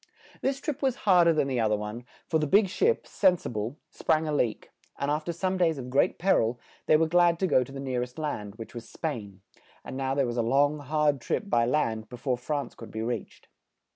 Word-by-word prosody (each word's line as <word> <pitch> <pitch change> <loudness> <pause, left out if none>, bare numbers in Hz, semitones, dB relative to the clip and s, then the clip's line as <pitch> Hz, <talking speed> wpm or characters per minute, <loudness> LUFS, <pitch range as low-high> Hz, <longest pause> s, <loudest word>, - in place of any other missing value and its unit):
This 270 0 0
trip 290 0 -4
was 265 -3 +1
hard 180 -4 +6
er 165 - +5
than 155 -3 +1
the 130 -3 0
oth 110 -1 +2
er - - +2
one, 105 +3 -6 0.2
for 160 - +1
the 150 - 0
big 200 +5 +4
ship, 455 - +1
"Sen 185 -3 +3
si - - -7
ble," 115 +5 -4
sprang 155 0 +1
a 150 - -1
leak, 120 -6 -1 0.3
and 140 +1 -1
af 150 +1 0
ter 170 - -1
some 185 +3 -1
days 165 -4 +2
of 125 -1 -6
great 135 - +2
per 190 +3 +3
il, 115 +2 -1 0.3
they 155 - +6
were 160 - +3
glad 170 +1 +4
to 190 - 0
go 130 -8 +3
to 125 - -12
the 135 - -7
near 130 -2 -2
est 125 0 -6
land, 110 -10 -4
which 115 +2 -9
was 120 -1 -8
Spain; 105 - -5 0.4
and - - -6
now 135 0 -1
there 140 -1 +2
was 120 0 -3
a - - +3
long, 145 +5 +2
hard 145 -1 +1
trip 200 - -2
by 115 0 +3
land 115 -6 0
be 125 - -8
fore 125 +1 0
France 145 +3 -3
could 115 - -11
be 110 0 -4
reached. 115 -2 -5
140 Hz, 250 wpm, -28 LUFS, 120-165 Hz, 0.4 s, hard